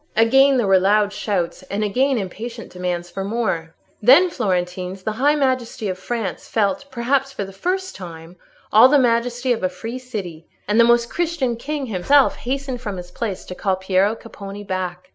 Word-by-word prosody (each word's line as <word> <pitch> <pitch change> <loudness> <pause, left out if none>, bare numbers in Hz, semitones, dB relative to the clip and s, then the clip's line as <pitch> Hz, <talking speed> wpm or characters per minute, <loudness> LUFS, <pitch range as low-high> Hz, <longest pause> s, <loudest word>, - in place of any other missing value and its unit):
Again 270 +5 +5
there 240 - +2
were 195 -1 +5
loud 205 +2 +2
shouts—and 195 0 -2
again 260 +6 +1
impatient 225 +4 -6
demands 175 -1 -3
for 195 +2 -4
more. 195 -7 -2 0.3
"Then, 280 - +6
Florentines, 185 - -2
the 215 - -1
high 290 +2 +4
majesty 255 -6 -1
of 185 0 -4
France 220 -3 -4
felt, 220 +6 0
perhaps 270 +3 0
for 200 - -4
the 195 - -11
first 375 - -2
time, 170 -1 -10 0.4
all 230 +4 +8
the 290 - +5
majesty 245 0 +1
of 230 - -4
a 185 - +1
free 225 +7 -6
city. 195 -10 -7 0.2
And 210 +3 +2
the - - +8
Most 235 0 +4
Christian 325 -8 -1
King 285 +4 -4
himself 255 +7 +3
hastened 265 -1 -3
from 205 -6 -4
his 175 0 -9
place 205 -2 -4
to - - -7
call 190 0 0
Piero 190 +3 +1
Capponi 205 -3 -9
back. 185 -2 -4
215 Hz, 180 wpm, -21 LUFS, 185-255 Hz, 0.4 s, all